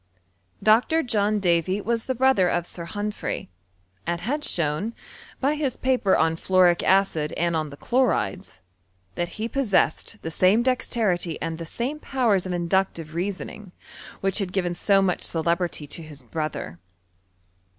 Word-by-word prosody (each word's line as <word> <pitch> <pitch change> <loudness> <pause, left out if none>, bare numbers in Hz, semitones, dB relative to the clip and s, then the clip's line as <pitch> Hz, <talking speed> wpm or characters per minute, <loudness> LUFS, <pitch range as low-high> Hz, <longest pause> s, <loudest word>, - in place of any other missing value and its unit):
Dr. 240 +10 +4
John 210 -3 +1
Davy 180 +1 +2
was 230 +2 -1
the 260 - 0
brother 250 -8 +4
of 175 - 0
Sir 170 -1 -7
Humphry, 205 - -4 0.6
«nd 170 0 -3
had 290 +9 -2
shown, 170 - -1 0.4
by 275 +2 +2
his 290 -4 -2
paper 255 -7 +2
on 160 0 +2
fluoric 180 -1 +4
acid 185 -6 +2
and 170 0 0
on 155 -1 -1
the 140 - -11
chlorides, 210 - 0 0.5
that 175 - -4
he 220 +1 -2
possessed 230 - 0
the 160 - -4
same 190 +8 +4
dexterity 220 -9 0
and 165 0 -4
the 165 - -5
same 260 - -3
powers 230 -11 +1
of - - -3
inductive 175 -2 -1
reasoning, 190 +2 -5 0.5
which 195 +2 +1
Iwd 195 -3 -2
given 180 -2 0
so 195 +2 +3
much 180 -2 0
celebrity 170 -1 -1
to 150 - -5
his 150 -4 -11
brother. 150 - -4
190 Hz, 150 wpm, -25 LUFS, 170-225 Hz, 0.6 s, Dr